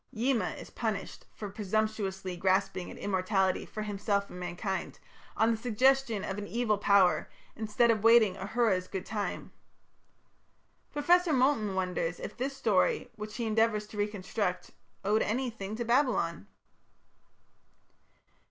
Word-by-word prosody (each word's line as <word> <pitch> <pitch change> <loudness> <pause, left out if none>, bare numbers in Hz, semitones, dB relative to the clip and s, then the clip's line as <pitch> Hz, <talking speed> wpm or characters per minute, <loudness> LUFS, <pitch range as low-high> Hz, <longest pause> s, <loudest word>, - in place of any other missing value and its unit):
Yima 245 +1 +1
is - - -10
punished - - -4
for 210 - -7
"presumptuously 200 -2 -2
grasping 190 0 0
at - - -9
immortality 190 -1 0
for 215 - -5
himself 200 -1 -1
and 180 - -8
mankind, 180 +2 -4 0.4
on 225 +1 +4
the 225 - 0
suggestion 245 -1 +2
of 195 +2 -3
an 205 - -6
evil 230 -3 0
power, 200 -3 +4 0.3
instead 220 +2 +2
of 220 -2 -1
waiting 230 -4 +6
Ahura's 195 -1 0
good 190 -2 -5
time". 210 -2 -4 1.4
Professor 345 +4 +3
Moulton 250 -7 +2
wonders 180 -2 -1
if - - -6
this 270 +2 -3
story, 445 - +1
which 215 0 -7
he 235 - -2
endeavours 220 -1 +2
to 210 - -13
reconstruct, 205 -2 -2 0.3
"owed 210 +2 +3
anything 220 -3 -2
to 235 +1 -3
Babylon?" 235 - +1
210 Hz, 130 wpm, -30 LUFS, 195-230 Hz, 1.4 s, waiting